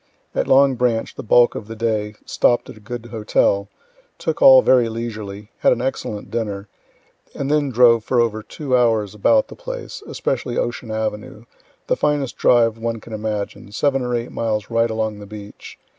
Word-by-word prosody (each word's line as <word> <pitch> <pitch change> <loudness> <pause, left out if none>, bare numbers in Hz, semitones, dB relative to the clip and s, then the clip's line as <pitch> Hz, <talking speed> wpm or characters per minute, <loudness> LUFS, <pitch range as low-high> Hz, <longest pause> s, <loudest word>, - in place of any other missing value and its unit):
At - - -1
Long 135 0 +5
Branch 120 -2 0
the - - -7
bulk 120 +2 +4
of 105 - -7
the 115 - -7
day, 110 -2 -1
stopt 120 - +1
at - - -14
a - - -14
good 120 +3 -7
hotel, 105 -3 0 0.5
took - - -3
all 265 -2 +9
very 125 -3 +4
leisurely, 110 -2 -6
had - - +4
an 125 - +1
excellent 120 -5 -4
dinner, 105 -3 -3 0.7
and 140 +1 -2
then 150 -2 +2
drove 120 -2 +5
for 125 +2 +1
over 110 -2 +1
two 130 +4 -3
hours 115 -5 +2
about 265 - +3
the - - -11
place, - - -7
especially - - -2
Ocean - - -3
avenue, 110 0 -4 0.4
the - - +1
finest 145 -3 0
drive 115 -2 +3
one 115 0 -3
can 110 - -11
imagine, 105 -1 -4
seven 135 +5 +1
or 125 -1 -1
eight 120 0 -3
miles 110 -1 -2
right 115 0 +2
along 110 -1 -2
the 105 - -10
beach. 105 0 -11
115 Hz, 180 wpm, -20 LUFS, 105-125 Hz, 0.7 s, all